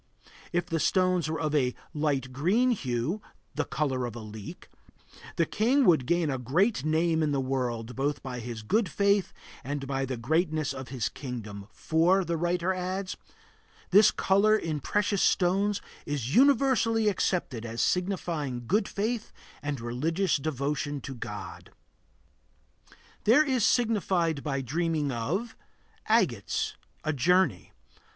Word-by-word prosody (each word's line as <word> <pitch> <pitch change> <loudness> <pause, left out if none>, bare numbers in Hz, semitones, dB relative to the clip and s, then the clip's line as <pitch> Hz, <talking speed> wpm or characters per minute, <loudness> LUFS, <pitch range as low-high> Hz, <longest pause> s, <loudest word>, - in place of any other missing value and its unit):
If 175 -1 0
the 165 -2 -2
stones 185 -2 +2
were 160 - -2
of 155 -2 -1
a 130 -4 +1 0.2
light 140 -4 -1
green 200 - +2
hue 140 - -2 0.3
(the - - -1
color 130 -2 -1
of 120 - -7
the 120 -1 -8
leek), 105 -1 -9 0.7
the 165 - +2
king 250 - +2
would 155 - +4
gain 170 -3 +1
a 130 - -2
great 155 - +1
name 160 +1 +2
in 155 -2 +1
the 140 - +1
world, 125 -3 -2
both 145 +2 -1
by 125 -2 -5
his 115 -2 -6
good 210 - +1
faith 200 +2 +2 0.3
and 140 +1 -4
by 135 0 -1
the 130 -1 -4
greatness 155 +4 0
of 130 -1 -7
his 125 -5 -2
kingdom; 105 -7 -7
for, 175 +4 +2
the 170 0 -1
writer 175 +2 0
adds, 185 +1 -3 0.8
"this 205 +2 +7
color 205 +3 +3
in 160 -7 -3
precious 205 +5 0
stones 195 +3 +2 0.3
is 140 -3 -2
universally 250 -4 +4
accepted 175 - 0
as 115 0 -6
signifying 170 -9 -1
good 200 - +1
faith 220 +3 -2 0.3
and 145 -1 -3
religious 155 +12 0
devotion 145 0 -2
to 135 - -6
God." 120 - -8 1.6
There 245 +8 +6
is 260 -6 0
signified 190 - +2
by 135 -2 -2
dreaming 155 +2 -1
of 165 - -2 0.5
Agates - - +1 0.3
A 155 - 0
journey. 150 - +2
155 Hz, 140 wpm, -28 LUFS, 130-190 Hz, 1.6 s, this